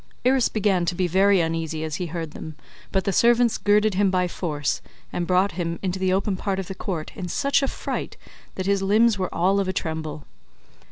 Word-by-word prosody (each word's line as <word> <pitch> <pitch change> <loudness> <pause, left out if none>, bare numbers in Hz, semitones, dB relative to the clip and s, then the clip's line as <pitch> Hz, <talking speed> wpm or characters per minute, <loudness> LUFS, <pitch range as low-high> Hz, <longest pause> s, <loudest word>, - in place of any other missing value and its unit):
Irus 260 -1 +4
began 195 -4 +1
to 175 +1 -1
be 185 - +1
very 190 +2 +4
uneasy 160 -1 -2
as 155 0 -3
he 180 - -3
heard 165 -1 -5
them, 155 0 -8 0.4
but 190 -1 +1
the 195 - -1
servants 235 +2 +4
girded 210 +1 +3
him 195 +1 +2
by 180 -1 +1
force, 150 -5 -2 0.3
and 175 -1 -2
brought 185 +2 +3
him 170 -1 -3
[into 190 0 -1
the 185 0 +1
open 195 +1 +1
part 190 +1 -2
of 190 - -3
the 190 - -6
court] 175 -4 -4
in 180 - -5
such 280 - +1
a 275 - +1
fright - - -4 0.4
that 185 - -3
his 200 0 +2
limbs 210 +2 +3
were 185 - -2
all 190 +4 +2
of 195 - 0
a 185 - -1
tremble. 160 -3 -4
185 Hz, 215 wpm, -24 LUFS, 170-200 Hz, 0.4 s, Irus